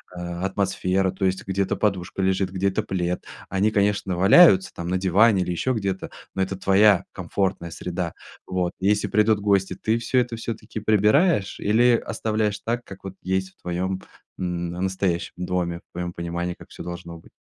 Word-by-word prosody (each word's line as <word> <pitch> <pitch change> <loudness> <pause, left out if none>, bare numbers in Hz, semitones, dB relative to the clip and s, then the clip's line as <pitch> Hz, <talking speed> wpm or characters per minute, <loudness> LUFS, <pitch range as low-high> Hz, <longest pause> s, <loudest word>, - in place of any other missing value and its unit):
а 85 0 -5
атмосфера, 95 -1 0
то 95 +1 -2
есть 95 0 -1
где-то 95 0 0
подушка 95 -2 -1
лежит, 95 0 +1
где-то 95 +1 0
плед. 90 -1 -2 0.3
Они, 100 +3 +2
конечно, 100 -2 +1
валяются 95 - +6
там 85 - -6
на 90 +1 +1
диване 95 +2 +4
или 90 - -3
еще 130 +9 0
где-то, 100 -4 -3 0.2
но 95 - -2
это 95 +1 -1
твоя 100 0 +4
комфортная 95 -3 -2
среда. 85 +1 -4 0.3
Вот. 90 -1 -1
И 95 - 0
если 105 0 +2
придут 105 0 +3
гости, 100 -2 +1
ты 110 +4 0
всё 115 +2 -1
это 120 -1 -4
всё-таки 115 -1 -5
прибираешь 110 - +3
или 120 +4 +4
оставляешь 110 -2 -1
так, 120 +1 -2
как 100 -3 -12
вот 95 -1 -6
есть 95 +1 -1
в - - -39
твоем 95 +2 -2 0.4
н 90 -1 -2
настоящем 95 -1 -1
доме, 90 -1 -2
в - - -74
твоем 90 0 -4
понимании, 85 +1 -3
как - - -14
всё - - -9
должно 85 -1 -7
быть. - - -19
95 Hz, 175 wpm, -24 LUFS, 90-105 Hz, 0.4 s, валяются